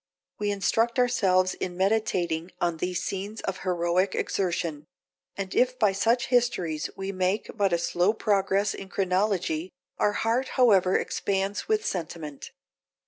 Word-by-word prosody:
We 205 0 0
instruct 225 +4 +1
ourselves 190 -7 +3
in 180 -1 -5
meditating 185 -4 0
on 170 -2 0
these 180 +1 -2
scenes 200 +3 -4
of 190 -1 -3
heroic 180 +1 0
exertion; 170 -5 -2 0.5
and 195 -1 -4
if 255 0 +2
by 210 -4 +3
such 230 +6 +1
histories 230 -11 +1
we 195 0 -3
make 185 +2 -1
but 200 -3 +2
a 170 - +3
slow 175 +3 +2
progress 200 -2 +1
in 195 - -8
chronology, 185 -3 0 0.3
our 205 - +2
heart 230 +5 0
however 195 -7 +5
expands 195 +1 -2
with 435 0 +1
sentiment. 160 -5 -5
195 Hz, 140 wpm, -27 LUFS, 180-210 Hz, 0.5 s, however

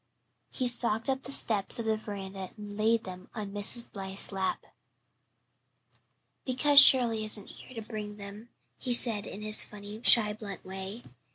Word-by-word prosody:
He 255 - -3
stalked 235 -1 +1
up 265 0 -2
the 270 - -9
steps 210 -7 +1
of 230 - -5
the 220 0 0
veranda 195 -3 -8
and 205 -1 -10
laid 225 +2 0
them 185 -1 -11
on 210 -3 -6
Mrs. 205 +4 +4
Blythe's 195 0 -6
lap. 190 -1 -4 1.8
"Because 280 +3 +4
Shirley 240 -5 +6
isn't 215 -1 -1
here 255 - -14
to 215 - -11
bring 210 -2 -8
them," 205 +3 -11 0.3
he 250 - -3
said 230 -4 +3
in 210 - -9
his 215 0 +2
funny, 210 +1 -11
shy, 210 -3 +5
blunt 210 -2 -10
way. 190 +4 -9
215 Hz, 160 wpm, -28 LUFS, 200-230 Hz, 1.8 s, Shirley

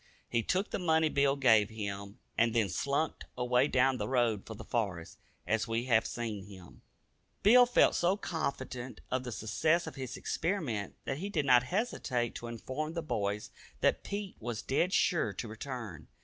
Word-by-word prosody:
He 115 - +1
took 185 - 0
the - - -1
money 160 -3 +3
Bill 140 -1 +3
gave 110 -6 +5
him, 100 -2 -5 0.2
and 115 0 +2
then 110 -4 +3
slunk 140 - -1
away 125 +2 +3
down 130 -1 +3
the - - -2
road 120 -6 +1
for 110 - -6
the - - -9
forest, 95 -8 -3 0.3
as 110 +5 0
we 115 +1 0
have 115 -3 +3
seen 110 -5 -4
him. 95 -4 -13 0.6
Bill 245 +4 +8
felt 245 - +5
so 180 +3 +2
confident 140 -8 -4
of 130 0 0
the 125 - -5
success 155 +10 +1
of - - -6
his 130 -2 -5
experiment 155 - -2
that 135 +1 -2
he 195 +4 -3
did 155 -8 0
not 125 -2 +6
hesitate 145 - -1
to 120 - -7
inform 130 +7 -4
the 165 -1 -3
boys 105 -7 -2 0.3
that - - +2
Pete 200 -1 -5
was 120 -1 -4
"dead 170 +7 +1
sure" 175 -3 +2
to 120 - -5
return. 110 - -7
125 Hz, 175 wpm, -32 LUFS, 110-155 Hz, 0.6 s, Bill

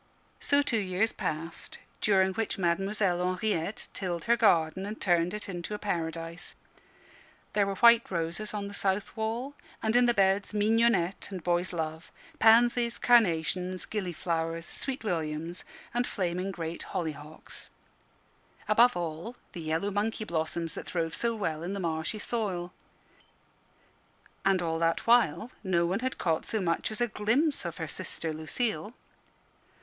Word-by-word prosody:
So 285 0 +3
two 235 -5 +1
years 195 +3 +1
passed, 165 +2 -4 0.2
during 190 -2 +3
which 225 +2 -2
Mademoiselle 190 0 +1
Henriette 205 -1 -2
tilled 175 -3 -3
her 235 - +5
garden 185 -5 +3
and 215 +1 -6
turned 175 -2 +2
it 210 +1 -4
into 180 +2 -4
a - - -3
paradise. 165 -3 -3 1.0
There 205 -1 +3
were 195 - -2
white 235 +2 +6
roses 175 +4 -2
on 205 -1 -3
the 200 - -8
south 195 0 -1
wall, 230 +5 -2 0.3
and 220 +1 0
in 245 0 +6
the 240 - +3
beds 195 +1 +2
mignonette 210 -4 +2
and 185 -4 -6
boy's 175 +1 +1
love, 160 -1 -4 0.3
pansies, 235 +1 +5
carnations, 185 -5 +3
gillyflowers, 165 -4 -2
sweet 265 +4 -4
williams, 165 -2 -2 0.3
and 245 +1 +1
flaming 180 0 -2
great 170 -3 -5
hollyhocks; 155 -2 -6 1.0
above 235 +1 +5
all, 170 +7 -4 0.2
the 170 - -7
yellow 160 +5 -1
monkey 215 +2 -1
blossoms 165 -1 -2
that - - -6
throve 165 -2 -1
so 235 -1 0
well 165 -7 -2
in 175 +3 -3
the 200 - -3
marshy 165 +3 -1
soil. 195 -6 -2 1.7
And 190 -2 +3
all 165 -1 -1
that 165 0 +1
while 230 -3 +3
no 175 -3 +2
one 185 +5 0
had 260 +2 -2
caught 165 -3 0
so 220 - -1
much 170 -3 0
as 215 +1 -4
a 240 - +3
glimpse 240 - +1
of 170 -1 -4
her 160 - -3
sister, 165 -1 -4
Lucille. 215 +8 -2
190 Hz, 145 wpm, -29 LUFS, 165-220 Hz, 1.7 s, white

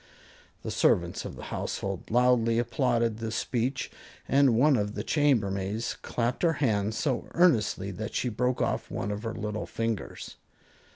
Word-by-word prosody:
The - - -4
servants - - +2
of - - -6
the - - -9
household 95 -2 -4
loudly 120 -1 +3
applauded 120 -1 +1
this 115 -1 -3
speech, 125 +2 -1 0.4
and 135 -3 +4
one 140 +5 +5
of 105 -2 -1
the 105 - -3
chambermaids 110 -8 +1
clapped 120 +1 -2
her 170 -2 +3
hands 110 -7 0
so 135 -6 -1
earnestly 110 - +3
that 105 +4 -6
she - - 0
broke 125 +2 0
off - - -2
one 100 - -3
of 105 0 -4
her 115 -1 -4
little 105 0 -4
fingers. 115 -2 -4
115 Hz, 155 wpm, -28 LUFS, 105-125 Hz, 0.4 s, one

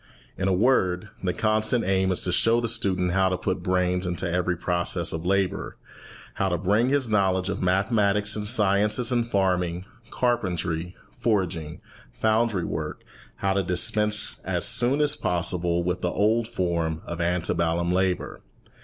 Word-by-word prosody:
In 95 - -2
a - - +2
word, 95 -2 +1
the 90 - +1
constant 110 +3 +1
aim 95 0 +1
is 90 - 0
to 90 - 0
show 115 +6 +3
the 120 - -1
student 95 -5 +1
how 95 +1 +2
to 90 - -1
put 95 0 -3
brains 90 0 0
into 90 +1 -3
every 90 0 -1
process 85 0 +1
of 80 +2 -4
labour, 95 -1 -1 0.6
how 95 - -1
to 90 - 0
bring 105 +7 +1
his 140 -2 +1
knowledge 95 -3 +1
of - - -3
mathematics 100 +2 +1
and 105 -1 -4
the - - +3
sciences 105 +2 +2
in 120 -1 +1
farming, 90 -4 -1 0.2
carpentry, 90 -8 -2 0.2
forging, 90 -8 -2 0.3
foundry 110 -4 0
work, - - -5 0.3
how 95 0 -1
to 100 - +1
dispense 105 +3 +1
as - - -1
soon 125 +4 +3
as 145 0 +1
possible 85 0 -1
with 90 +1 -2
the 90 - 0
old 110 +4 +1
form 85 -7 -2
of 85 0 -5
ante 90 0 0
bellum 85 +1 0
labour. 95 0 -1
95 Hz, 160 wpm, -25 LUFS, 90-105 Hz, 0.6 s, show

